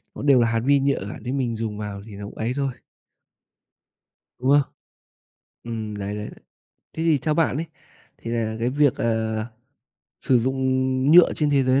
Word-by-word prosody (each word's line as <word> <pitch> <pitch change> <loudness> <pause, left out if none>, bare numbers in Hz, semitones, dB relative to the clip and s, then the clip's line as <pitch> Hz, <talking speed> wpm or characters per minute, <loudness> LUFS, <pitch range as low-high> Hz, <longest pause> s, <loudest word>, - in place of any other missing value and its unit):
nó - - -7
đều 140 -3 +5
là 115 - +3
hạt 115 0 +1
vi 140 0 +4
nhựa 140 0 +1
cả - - -8
nên 125 +4 -3
mình 120 -3 -1
dùng 110 -2 -4
vào 105 -2 -6
thì 110 - -12
nó 100 - -7
cũng 100 - -10
ấy 115 +3 -1
thôi. 140 -2 -1 1.7
Đúng 130 +2 0
không? 145 0 +6 1.0
Ừm, 110 -3 -5
đấy, 100 +1 -4
đấy. 105 0 -5 0.6
Thế 160 - -4
thì 160 -4 +3
theo 155 +3 -1
bạn 160 -4 +1
ấy 165 - -3 0.5
thì 115 - -7
là 110 -2 -1
cái 120 - +1
việc, 145 -1 +3
ờ, 110 -1 -1 0.7
sử 130 - +3
dụng 130 +3 -1 0.6
nhựa 175 0 +8
trên 150 -1 0
thế 140 -2 +3
giới 130 +1 +3
120 Hz, 190 wpm, -23 LUFS, 110-140 Hz, 1.7 s, nhựa